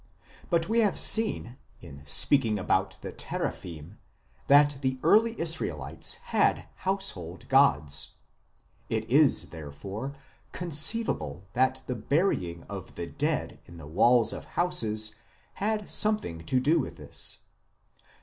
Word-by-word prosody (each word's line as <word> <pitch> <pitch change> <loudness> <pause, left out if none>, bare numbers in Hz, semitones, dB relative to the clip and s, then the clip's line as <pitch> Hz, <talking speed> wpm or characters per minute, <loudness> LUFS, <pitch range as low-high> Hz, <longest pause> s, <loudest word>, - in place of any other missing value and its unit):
But 165 -2 +1
we 230 +1 +2
have 210 -4 +2
seen, 215 - +2 0.2
in 70 0 -12
speaking 115 - +3
about 95 - 0
the - - -6
Teraphim, 85 +3 -6 0.5
that 145 0 +5
the 130 -1 -1
early 225 +7 +4
Israelites 80 - -2 0.2
had - - +2
household 140 - -4
gods; 75 - +3 0.8
it 110 0 -2
is, 140 +3 +4
therefore, 95 - -7 0.4
conceivable 170 - +1
that 130 +1 +1
the 125 - -3
burying 110 - 0
of - - -9
the - - -4
dead - - -2
in 85 - -12
the 80 - -10
walls 115 - +3
of - - -7
houses 110 -11 0 0.5
had 210 0 -1
something 210 - +2
to 130 - +2
do 155 +6 +3
with 135 - -5
this. - - -2
130 Hz, 120 wpm, -28 LUFS, -, 0.8 s, that